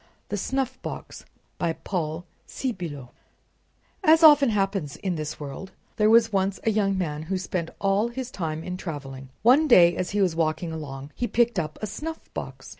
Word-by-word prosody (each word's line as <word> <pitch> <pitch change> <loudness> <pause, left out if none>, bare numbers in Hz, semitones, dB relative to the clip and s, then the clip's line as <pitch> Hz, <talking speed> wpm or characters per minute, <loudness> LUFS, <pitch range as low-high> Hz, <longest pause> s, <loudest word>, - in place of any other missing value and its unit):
THE - - -2
SNUFFBOX 260 +4 -4 0.3
By 165 - 0
Paul 165 -1 -4 0.2
Sébillot 170 - -5 0.9
As 325 -1 +6
often 295 -4 +8
happens 195 -8 -1
in 185 +2 -2
this 155 -2 -5
world, 145 +6 -7 0.2
there 215 0 +4
was 225 -1 +5
once 195 0 0
a 225 - +2
young 200 -2 +1
man 150 -5 -2
who 185 +4 -2
spent 180 -2 -3
all 195 +3 +2
his 250 +1 -6
time 160 -6 -4
in 180 +1 -5
traveling. 135 -7 -7
One 270 +7 +6
day, 175 - +7
as 185 - -2
he 205 - -1
was 175 -4 +1
walking 165 +1 -1
along, 140 -3 -7
he 245 - -2
picked 235 -4 +2
up 155 -2 -4
a - - +2
snuffbox. 305 +11 -7
190 Hz, 170 wpm, -25 LUFS, 160-225 Hz, 0.9 s, often